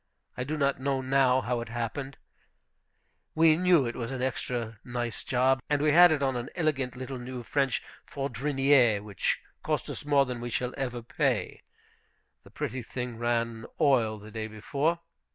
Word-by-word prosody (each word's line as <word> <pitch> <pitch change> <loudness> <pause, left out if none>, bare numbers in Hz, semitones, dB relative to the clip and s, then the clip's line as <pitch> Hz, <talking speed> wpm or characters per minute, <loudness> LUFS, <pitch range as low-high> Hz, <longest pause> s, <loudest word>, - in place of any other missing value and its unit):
I 125 - -3
do 150 +4 -3
not 140 -2 +1
know 135 0 0
now 130 -1 +3
how 120 0 -1
it 115 - -7
happened. 120 +4 -4 1.2
We 160 0 +6
knew 175 -4 +4
it 120 - -3
was 115 -2 -4
an 130 -1 -3
extra 120 -3 -3
nice 120 -2 -4
job. 130 +1 +2
And 145 -1 +2
we 150 +1 +3
had 175 +2 +8
it 145 -3 +1
on 135 -1 +1
an 120 0 -4
elegant 140 -7 0
little 130 0 -6
new 125 0 -6
French 135 +2 0 0.2
Fourdrinier, 135 -4 +2
which 105 -3 -1 0.2
cost - - -2
us - - -6
more 145 -1 +4
than 125 -2 -5
we 120 - -4
shall 125 +2 -2
ever 125 -3 -3
pay. 115 - -1 0.8
The - - -16
pretty 130 - -4
thing 125 0 -6
ran 115 -1 0
like - - -11
oil 115 -6 +3
the 105 +1 -12
day 110 0 -4
before. 140 +10 -1
130 Hz, 175 wpm, -28 LUFS, 120-140 Hz, 1.2 s, had